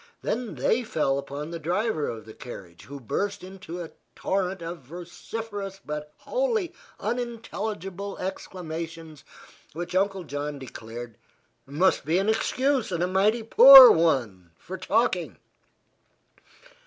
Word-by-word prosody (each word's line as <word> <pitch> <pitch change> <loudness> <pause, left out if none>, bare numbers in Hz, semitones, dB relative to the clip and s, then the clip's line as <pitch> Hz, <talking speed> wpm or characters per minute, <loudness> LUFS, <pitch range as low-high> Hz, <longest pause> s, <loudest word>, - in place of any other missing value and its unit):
Then 240 -1 -3
they 245 +3 +1
fell 140 -10 0
upon 145 +3 -6
the 170 - -5
driver 175 0 -1
of 115 -1 -7
the 110 - -11
carriage, 90 -9 -11
who 140 +1 -9
burst 200 - -3
into 180 -2 -8
a 165 - -10 0.2
torrent 190 -2 -2
of 170 +1 -6
vociferous 195 - -7
but 150 0 -5
wholly 460 -8 -1 0.3
unintelligible 215 -4 -4
exclamations 165 -4 -7 0.5
which 175 +3 -6
Uncle 195 0 0
John 145 -1 -5
declared 120 -3 -9 0.5
"must 155 +7 +2
be 160 +5 +1
an 195 +3 +1
excuse 255 +2 0
and 175 -1 -1
a - - +1
mighty 205 +5 +2
poor 255 +3 +11
one 115 - 0
for 185 - -8
talking." 185 -1 0
180 Hz, 125 wpm, -26 LUFS, 150-210 Hz, 0.5 s, poor